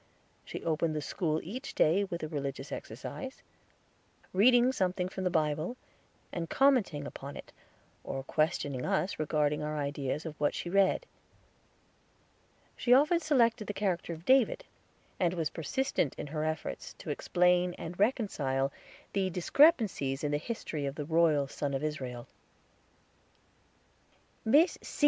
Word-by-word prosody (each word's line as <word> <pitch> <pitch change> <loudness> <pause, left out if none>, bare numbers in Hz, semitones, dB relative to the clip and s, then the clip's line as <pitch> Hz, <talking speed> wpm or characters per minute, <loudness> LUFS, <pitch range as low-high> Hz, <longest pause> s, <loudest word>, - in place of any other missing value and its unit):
She - - -7
opened 160 -1 0
the 150 - -1
school 155 -1 -1
each 250 +10 -6
day 175 +6 +4
with 170 -3 -5
a - - -1
religious 140 -2 -4
exercise, 265 0 -7 0.9
reading 245 +5 +5
something 185 -5 0
from 190 0 -5
the - - +3
Bible, 155 +7 0 0.6
and 165 -2 -3
commenting 240 - +3
upon 140 0 -8
it, - - -11 0.5
or 135 - -4
questioning 145 -3 0
us 195 -2 0
regarding 150 -1 +1
our 150 0 -3
ideas 145 +1 -2
of 160 - -4
what 145 - +1
she 175 - -4
read. 195 - +3 1.7
She 245 0 +4
often 305 +5 +4
selected 235 -9 +2
the 205 - -4
character 185 -4 -1
of 165 +1 -8
David, 265 - +3 0.5
and 180 -2 +1
was 165 -3 -1
persistent 175 - -1
in - - -5
her 150 +1 -3
efforts 155 +1 -4
to - - -6
explain 180 0 +2
and 175 +3 -7
reconcile 145 - +1 0.4
the 195 -2 +1
discrepancies 185 - +3
in 145 - 0
the 145 - +2
history 155 -7 -4
of 135 - -4
the 150 - -4
royal 160 -3 +3
Son 140 0 -3
of 135 - -3
Israel. 130 -6 -4 2.2
"Miss 295 +10 +4
_C. - - -9
170 Hz, 140 wpm, -31 LUFS, 150-205 Hz, 2.2 s, reading